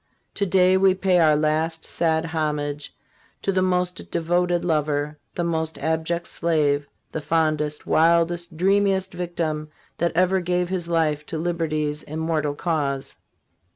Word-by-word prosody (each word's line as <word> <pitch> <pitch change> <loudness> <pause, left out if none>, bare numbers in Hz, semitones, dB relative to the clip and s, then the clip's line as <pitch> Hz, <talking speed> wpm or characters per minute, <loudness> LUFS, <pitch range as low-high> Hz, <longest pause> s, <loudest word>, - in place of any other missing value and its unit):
To 200 - -1
day 185 0 +4
we 190 -1 +4
pay 185 -1 +2
our 155 -2 +5
last 155 +2 0
sad 160 -1 0
homage 150 -2 -2 0.5
to 195 - +1
the 185 -1 +1
most 180 -1 -1
devoted 175 +1 0
lover, 150 -2 0 0.2
the 175 - -1
most 160 -1 -1
abject 160 +2 -1
slave, 150 -4 0 0.2
the 160 - -4
fondest, 155 -1 0
wildest, 170 0 +2
dreamiest 195 +1 +2
victim 165 -3 -3 0.3
that 170 0 +1
ever 185 +2 +3
gave 180 0 -1
his 180 -3 -2
life 160 -3 +1
to 160 - -4
liberty's 155 -3 -1
immortal 155 -1 -2
cause. 145 -5 -2
165 Hz, 135 wpm, -23 LUFS, 155-175 Hz, 0.5 s, our